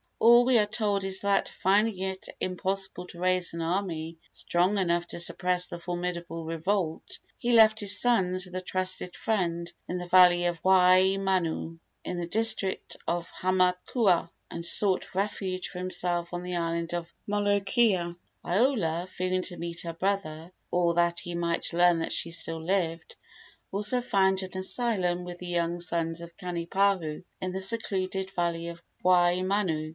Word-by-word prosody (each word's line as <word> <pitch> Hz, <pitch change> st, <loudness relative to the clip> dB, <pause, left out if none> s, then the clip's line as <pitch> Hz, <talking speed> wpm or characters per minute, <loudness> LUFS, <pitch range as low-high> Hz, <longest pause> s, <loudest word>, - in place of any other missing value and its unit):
All 240 Hz, +1 st, +6 dB
we 255 Hz, -1 st, +4 dB
are 210 Hz, -, +4 dB
told 205 Hz, -2 st, 0 dB
is 190 Hz, 0 st, +2 dB
that, 200 Hz, -1 st, +1 dB
finding 200 Hz, +1 st, +1 dB
it 190 Hz, 0 st, -4 dB
impossible 190 Hz, 0 st, -2 dB
to 170 Hz, -, -12 dB
raise 185 Hz, -1 st, 0 dB
an 170 Hz, -, -4 dB
army 165 Hz, -2 st, -3 dB
strong 180 Hz, +4 st, 0 dB
enough 175 Hz, -2 st, 0 dB
to -, -, -6 dB
suppress 180 Hz, +1 st, +1 dB
the 175 Hz, -, -7 dB
formidable 175 Hz, -1 st, -4 dB
revolt, 165 Hz, +1 st, -2 dB, 0.2 s
he 240 Hz, -, -1 dB
left 220 Hz, -1 st, +6 dB
his 205 Hz, -2 st, +6 dB
sons 185 Hz, -6 st, +2 dB
with 180 Hz, 0 st, -12 dB
a 185 Hz, -, -2 dB
trusted 185 Hz, 0 st, -3 dB
friend 170 Hz, -6 st, -2 dB, 0.2 s
in 180 Hz, -, -3 dB
the 180 Hz, -, -6 dB
valley 175 Hz, -1 st, +6 dB
of 175 Hz, -1 st, -2 dB
Waimanu, 185 Hz, -2 st, +3 dB, 0.2 s
in 180 Hz, -, -4 dB
the 170 Hz, -, -3 dB
district 220 Hz, -1 st, +2 dB
of 170 Hz, 0 st, -2 dB
Hamakua, 185 Hz, 0 st, +1 dB, 0.2 s
and 170 Hz, -, -7 dB
sought 190 Hz, +2 st, +1 dB
refuge 190 Hz, -2 st, -2 dB
for 180 Hz, -, -8 dB
himself 175 Hz, -1 st, -1 dB
on 175 Hz, 0 st, -4 dB
the 180 Hz, 0 st, -4 dB
island 170 Hz, 0 st, -2 dB
of 170 Hz, -1 st, -5 dB
Molokai. 205 Hz, -2 st, +1 dB, 0.3 s
Iola, 180 Hz, -, +1 dB
fearing 185 Hz, 0 st, -2 dB
to 180 Hz, -2 st, -6 dB
meet 170 Hz, 0 st, -5 dB
her 170 Hz, -1 st, -5 dB
brother, 170 Hz, -3 st, -3 dB, 0.2 s
or 175 Hz, -1 st, +1 dB
that 170 Hz, 0 st, +2 dB
he 175 Hz, -, -6 dB
might 170 Hz, -1 st, -2 dB
learn 175 Hz, 0 st, +4 dB
that 165 Hz, -, -3 dB
she 170 Hz, -, -1 dB
still 165 Hz, -1 st, -3 dB
lived, 170 Hz, -2 st, -2 dB, 0.6 s
also 210 Hz, +5 st, +2 dB
found 190 Hz, -5 st, +2 dB
an 190 Hz, 0 st, -7 dB
asylum 185 Hz, -3 st, +1 dB
with 175 Hz, 0 st, -8 dB
the 180 Hz, -, -7 dB
young 170 Hz, 0 st, -1 dB
sons 170 Hz, -1 st, -1 dB
of 170 Hz, 0 st, -11 dB
Kanipahu 180 Hz, -1 st, -1 dB, 0.2 s
in 185 Hz, -, -3 dB
the 190 Hz, +1 st, -4 dB
secluded 190 Hz, -2 st, -1 dB
valley 170 Hz, -2 st, -2 dB
of 170 Hz, 0 st, -8 dB, 0.2 s
Waimanu. 180 Hz, -2 st, +2 dB
180 Hz, 160 wpm, -28 LUFS, 170-195 Hz, 0.6 s, All